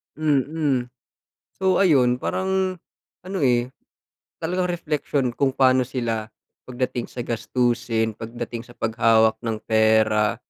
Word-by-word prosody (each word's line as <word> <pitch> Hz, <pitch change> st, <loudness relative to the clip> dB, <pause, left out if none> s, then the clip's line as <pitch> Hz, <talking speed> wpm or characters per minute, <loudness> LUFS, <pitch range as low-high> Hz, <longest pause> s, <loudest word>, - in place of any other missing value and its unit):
Mm. 145 Hz, -3 st, 0 dB, 0.7 s
So 190 Hz, -1 st, +2 dB
ayun, 130 Hz, -9 st, +4 dB
parang 190 Hz, 0 st, -1 dB, 0.5 s
ano, 190 Hz, +1 st, -4 dB
eh, 125 Hz, -2 st, +2 dB, 0.7 s
talagang 180 Hz, +2 st, 0 dB
reflection 150 Hz, -6 st, -1 dB
kung 135 Hz, +2 st, 0 dB
pano 130 Hz, -1 st, +4 dB
sila 115 Hz, -4 st, -2 dB, 0.4 s
pagdating 125 Hz, -1 st, -3 dB
sa 120 Hz, -, -6 dB
gastusin, 115 Hz, -1 st, 0 dB
pagdating 115 Hz, +2 st, -7 dB
sa 120 Hz, -, -15 dB
paghawak 110 Hz, -1 st, +3 dB
ng 115 Hz, -1 st, -2 dB
pera. 110 Hz, -1 st, +3 dB
125 Hz, 110 wpm, -23 LUFS, 115-150 Hz, 0.7 s, ayun